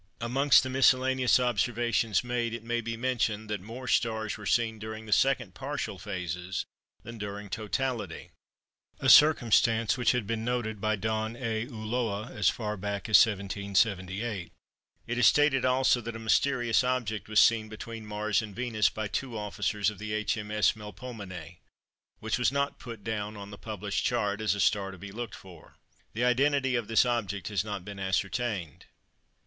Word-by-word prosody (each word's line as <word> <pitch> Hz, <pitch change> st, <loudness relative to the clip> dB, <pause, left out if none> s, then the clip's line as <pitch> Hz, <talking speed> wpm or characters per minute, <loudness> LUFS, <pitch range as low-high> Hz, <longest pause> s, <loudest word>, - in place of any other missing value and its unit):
Amongst 130 Hz, +4 st, +4 dB
the 130 Hz, -, -4 dB
miscellaneous 130 Hz, -1 st, +4 dB
observations 120 Hz, -1 st, +1 dB
made, 120 Hz, -1 st, -2 dB
it 115 Hz, -, -8 dB
may 120 Hz, +1 st, -1 dB
be 115 Hz, 0 st, -4 dB
mentioned 115 Hz, -4 st, -1 dB
that 105 Hz, -3 st, -2 dB
more 120 Hz, +6 st, -8 dB
stars 110 Hz, -3 st, 0 dB
were 105 Hz, -2 st, -8 dB
seen 115 Hz, -2 st, +1 dB
during 110 Hz, +1 st, -7 dB
the 105 Hz, -, +1 dB
second 125 Hz, -7 st, +2 dB
partial 135 Hz, -7 st, -4 dB
phases 90 Hz, -2 st, -4 dB, 0.4 s
than 115 Hz, -1 st, -9 dB
during 100 Hz, -1 st, -6 dB
totality 120 Hz, +2 st, -3 dB, 0.7 s
(a -, -, +1 dB
circumstance 115 Hz, -5 st, +5 dB
which 125 Hz, -, +3 dB
had 125 Hz, -4 st, -1 dB
been 110 Hz, +1 st, -2 dB
noticed 115 Hz, -3 st, -2 dB
by 110 Hz, 0 st, +1 dB
Don 110 Hz, +2 st, -2 dB
A. 115 Hz, -2 st, -2 dB
Ulloa 110 Hz, -2 st, -3 dB
as 105 Hz, -8 st, +2 dB
far 105 Hz, -2 st, -3 dB
back 100 Hz, +3 st, -4 dB
as 110 Hz, -, +8 dB
1778). 100 Hz, -1 st, -1 dB, 0.5 s
It 120 Hz, -, -3 dB
is 115 Hz, -, +6 dB
stated 145 Hz, -3 st, +4 dB
also 130 Hz, -1 st, +3 dB
that 115 Hz, 0 st, -6 dB
a 115 Hz, 0 st, -8 dB
mysterious 120 Hz, 0 st, +2 dB
object 120 Hz, -5 st, -2 dB
was 110 Hz, -, +4 dB
seen 110 Hz, -2 st, +4 dB
between 110 Hz, +1 st, -8 dB
Mars 105 Hz, +1 st, 0 dB
and 105 Hz, -3 st, -8 dB
Venus 115 Hz, -3 st, +1 dB
by 110 Hz, -1 st, -4 dB
two 115 Hz, +3 st, -3 dB
officers 105 Hz, 0 st, -1 dB
of 100 Hz, -2 st, -13 dB
H.M.S. 105 Hz, 0 st, 0 dB
Melpomene, 105 Hz, -, -9 dB, 0.6 s
which 110 Hz, +4 st, -2 dB
was 125 Hz, -, +3 dB
not 140 Hz, 0 st, -1 dB
put 115 Hz, -4 st, -9 dB
down 105 Hz, -1 st, -3 dB
on 100 Hz, 0 st, -9 dB
the -, -, -7 dB
published 105 Hz, -2 st, -3 dB
chart 105 Hz, -4 st, 0 dB
as 105 Hz, -2 st, +1 dB
a -, -, -5 dB
star 100 Hz, -1 st, +2 dB
to 95 Hz, -, -9 dB
be 100 Hz, +3 st, -9 dB
looked 115 Hz, +1 st, -6 dB
for. 90 Hz, -4 st, -15 dB, 0.4 s
The 120 Hz, +3 st, 0 dB
identity 135 Hz, +1 st, +2 dB
of 120 Hz, -3 st, -1 dB
this 115 Hz, +2 st, +4 dB
object 105 Hz, -6 st, -2 dB
has 100 Hz, -4 st, 0 dB
not 100 Hz, -4 st, -5 dB
been 100 Hz, -1 st, -8 dB
ascertained. 95 Hz, -, -2 dB
110 Hz, 165 wpm, -29 LUFS, 105-120 Hz, 0.7 s, as